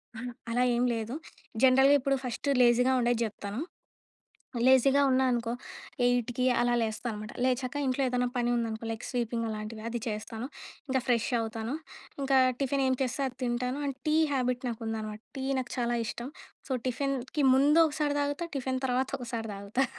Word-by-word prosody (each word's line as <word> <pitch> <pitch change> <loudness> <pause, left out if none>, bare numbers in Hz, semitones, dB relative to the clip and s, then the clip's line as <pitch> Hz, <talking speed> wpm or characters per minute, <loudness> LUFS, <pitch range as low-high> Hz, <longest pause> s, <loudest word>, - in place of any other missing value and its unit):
అహా! 245 +2 -5 0.2
అలా 245 +2 +2
ఏం 240 - +2
లేదు. 225 +1 -3 0.5
జనరల్‌గా 265 +2 +7
ఇప్పుడు 275 +1 +1
ఫస్ట్ 250 +3 -4
లేజీగా 245 +1 +5
ఉండేది 240 -1 +2
జెప్తాను. 205 0 -4 1.1
లేజీగా 265 +2 +5
ఉన్నానుకో, 250 -3 +2 0.5
8కి 245 0 +1 0.2
అలా 240 0 +2
లేస్తా 220 +2 -3
అనమాట. 210 +1 -7
లేచాక 255 +1 0
ఇంట్లో 260 +1 0
ఏదైనా 250 0 +1
పని 240 -1 +1
ఉందనుకో, 225 -1 -2
లైక్ 225 +1 -5
స్వీపింగ్ 235 -2 -1
అలాంటివి 215 0 -5
అది 235 0 -3
చేస్తాను. 220 +2 -4 0.4
ఇంకా 260 0 +1
ఫ్రెష్ 235 -3 +2
అవుతాను. 225 +3 -3 0.5
ఇంకా 270 0 +3 0.2
టిఫిన్ 275 0 +1
ఏం 260 - +2
చేస్తే 265 +2 -1
అది 255 - -13
తింటాను. 250 +3 -1
And 275 -2 -3
tea 305 - +3 0.2
habit 250 -1 0
నాకుందనమాట. 220 -2 -4 0.2
టీ 265 - -3 0.2
నాకు 245 - -7
చాలా 240 0 +1
ఇష్టం. 240 +3 -5 0.4
సో, - - -2
టిఫిన్‌కి 275 +2 -1
ముందు 285 +4 +5
ఒకసారి 295 -1 -1
తాగుతా. 285 +4 -1
టిఫిన్ 260 0 -2
తర్వాత 255 +1 0
ఒకసారి 235 -3 -4
తాగుతా. 200 +7 -1
245 Hz, 155 wpm, -29 LUFS, 230-265 Hz, 1.1 s, జనరల్‌గా